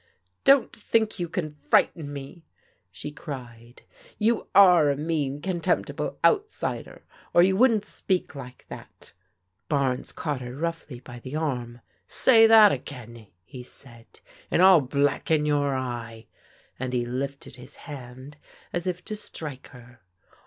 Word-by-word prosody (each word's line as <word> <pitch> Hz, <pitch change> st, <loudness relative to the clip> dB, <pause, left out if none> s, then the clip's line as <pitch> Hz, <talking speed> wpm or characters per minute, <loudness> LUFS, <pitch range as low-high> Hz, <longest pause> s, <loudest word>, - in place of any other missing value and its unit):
••Don't 275 Hz, -3 st, +5 dB
think 220 Hz, -1 st, 0 dB
you 175 Hz, -1 st, -3 dB
can 160 Hz, -3 st, -3 dB
frighten 150 Hz, +1 st, +1 dB
me," 140 Hz, +4 st, -9 dB, 0.5 s
she 150 Hz, +11 st, -7 dB
cried. 120 Hz, -5 st, -10 dB, 0.4 s
"Ycm 225 Hz, +1 st, +1 dB
ore 180 Hz, -6 st, +7 dB
a 140 Hz, -, 0 dB
mean, 145 Hz, -3 st, -2 dB
contemptible 175 Hz, -3 st, -2 dB
outsider, 430 Hz, 0 st, -1 dB, 0.3 s
or 175 Hz, -, +7 dB
you 190 Hz, +1 st, +3 dB
wouldn't 225 Hz, -2 st, +3 dB
speak 190 Hz, -3 st, -2 dB
like 125 Hz, -3 st, -10 dB
that" -, -, -12 dB, 0.6 s
Barnes 135 Hz, -3 st, 0 dB
caught 145 Hz, -4 st, -4 dB
her 125 Hz, 0 st, -7 dB
roughly 165 Hz, -4 st, -4 dB
by 120 Hz, -2 st, -11 dB
the 130 Hz, +4 st, -8 dB
arm, 125 Hz, -6 st, -3 dB, 0.3 s
*'Say 225 Hz, -3 st, +6 dB
that 220 Hz, -2 st, +8 dB
again/' 120 Hz, -4 st, -7 dB, 0.2 s
he 125 Hz, +6 st, -10 dB
said, 120 Hz, -2 st, -11 dB, 0.3 s
" -, -, -26 dB
and 180 Hz, -, +3 dB
I'll 185 Hz, -4 st, +8 dB
blacken 145 Hz, +3 st, 0 dB
your 145 Hz, -2 st, +1 dB
eye," 120 Hz, -3 st, -5 dB, 0.5 s
and 130 Hz, 0 st, -4 dB
he 120 Hz, -1 st, 0 dB
lifted 135 Hz, +3 st, -5 dB
his 125 Hz, +2 st, -12 dB
hand 130 Hz, 0 st, -10 dB, 0.4 s
as 175 Hz, +1 st, -3 dB
if 180 Hz, 0 st, -3 dB
to 215 Hz, -, -5 dB
strike 150 Hz, -9 st, -8 dB
her. 120 Hz, -2 st, -16 dB
145 Hz, 140 wpm, -25 LUFS, 125-175 Hz, 0.6 s, that